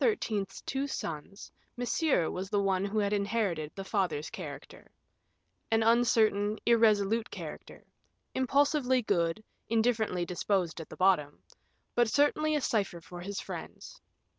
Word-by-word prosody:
's 210 Hz, -, 0 dB
two 275 Hz, +1 st, -1 dB
sons, 165 Hz, -, -6 dB, 0.3 s
Monsieur 245 Hz, -, +1 dB
was 190 Hz, +1 st, -4 dB
the 205 Hz, -1 st, +1 dB
one 195 Hz, -1 st, +1 dB
who 200 Hz, +2 st, -3 dB
had 205 Hz, -1 st, +1 dB
inherited 200 Hz, -7 st, -1 dB
the 195 Hz, -, -5 dB
father's 180 Hz, -7 st, -1 dB
character -, -, -9 dB, 0.8 s
an 225 Hz, 0 st, +3 dB
uncertain, 220 Hz, -3 st, +3 dB
irresolute 225 Hz, -1 st, +3 dB
character; -, -, -9 dB, 0.5 s
impulsively 260 Hz, -1 st, +2 dB
good, 170 Hz, +1 st, 0 dB, 0.3 s
indifferently 220 Hz, -5 st, +1 dB
disposed 180 Hz, -1 st, -1 dB
at 160 Hz, -, -10 dB
bottom; 180 Hz, -6 st, +2 dB, 0.5 s
but 240 Hz, -2 st, +3 dB
certainly 300 Hz, +4 st, +2 dB
a 295 Hz, -, +1 dB
cipher 200 Hz, -8 st, 0 dB
for 175 Hz, +2 st, -10 dB
his 200 Hz, +2 st, -4 dB
friends. -, -, -8 dB
205 Hz, 125 wpm, -30 LUFS, 185-235 Hz, 0.8 s, an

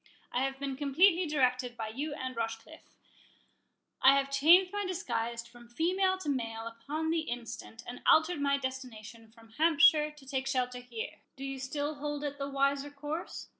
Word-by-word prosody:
—I 250 Hz, -, 0 dB
have 270 Hz, 0 st, -3 dB
been 275 Hz, -1 st, -3 dB
completely 335 Hz, +6 st, +4 dB
directed 255 Hz, -4 st, +1 dB
by 220 Hz, -1 st, -4 dB
you 280 Hz, +7 st, -4 dB
and 260 Hz, -3 st, -5 dB
Rochecliffe—I 230 Hz, +2 st, -3 dB
have 275 Hz, 0 st, -1 dB
changed 345 Hz, +7 st, +6 dB
my 410 Hz, 0 st, -1 dB
disguise 235 Hz, -, -3 dB
from 240 Hz, 0 st, -16 dB
female 375 Hz, +8 st, +1 dB
to 375 Hz, -, -8 dB
male 225 Hz, -5 st, -2 dB
upon 285 Hz, +8 st, -3 dB
the 330 Hz, -, +2 dB
instant, 235 Hz, -4 st, -6 dB
and 245 Hz, -, -8 dB
altered 315 Hz, -1 st, +4 dB
my 280 Hz, 0 st, +2 dB
destination 235 Hz, -4 st, -7 dB
from 225 Hz, 0 st, -18 dB
Hampshire 315 Hz, -1 st, +5 dB
to 300 Hz, -2 st, -16 dB
take 265 Hz, 0 st, -2 dB
shelter 250 Hz, -1 st, -1 dB
here—Do 245 Hz, +2 st, -8 dB
you 270 Hz, 0 st, -5 dB
still 285 Hz, +3 st, -3 dB
hold 295 Hz, 0 st, -3 dB
it 285 Hz, -1 st, -4 dB
the 275 Hz, 0 st, -3 dB
wiser 275 Hz, +1 st, +1 dB
course?" 295 Hz, +3 st, -6 dB
275 Hz, 165 wpm, -31 LUFS, 245-305 Hz, -, changed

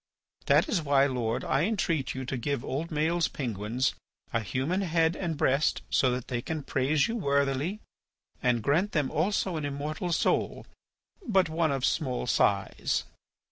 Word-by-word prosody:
That -, -, +5 dB
is 215 Hz, -, 0 dB
why, 140 Hz, -2 st, +4 dB
Lord, 120 Hz, -4 st, -1 dB
I 135 Hz, -, +1 dB
entreat 170 Hz, -11 st, -1 dB
you 130 Hz, 0 st, -4 dB
to 135 Hz, -, -3 dB
give 130 Hz, +1 st, -2 dB
old 150 Hz, +5 st, -2 dB
Maël's 165 Hz, +2 st, +1 dB
penguins 120 Hz, 0 st, -2 dB, 0.4 s
a 115 Hz, -, +2 dB
human 130 Hz, -, -1 dB
head 165 Hz, -2 st, +2 dB
and 170 Hz, -5 st, -3 dB
breast 140 Hz, +2 st, +2 dB
so 130 Hz, -, +3 dB
that 125 Hz, 0 st, -2 dB
they 120 Hz, -2 st, -2 dB
can 155 Hz, +3 st, -4 dB
praise 140 Hz, +2 st, +1 dB
you 230 Hz, -, -3 dB
worthily. 140 Hz, -, 0 dB, 0.6 s
And 120 Hz, -3 st, +1 dB
grant 170 Hz, -, +1 dB
them 145 Hz, -4 st, +1 dB
also 185 Hz, +1 st, 0 dB
an 155 Hz, -, -3 dB
immortal 150 Hz, +5 st, -3 dB
soul—but 190 Hz, -, -1 dB
one 160 Hz, -1 st, +1 dB
of 135 Hz, -2 st, 0 dB
small 130 Hz, -7 st, 0 dB
size." 100 Hz, -5 st, +1 dB
145 Hz, 155 wpm, -28 LUFS, 130-165 Hz, 0.6 s, That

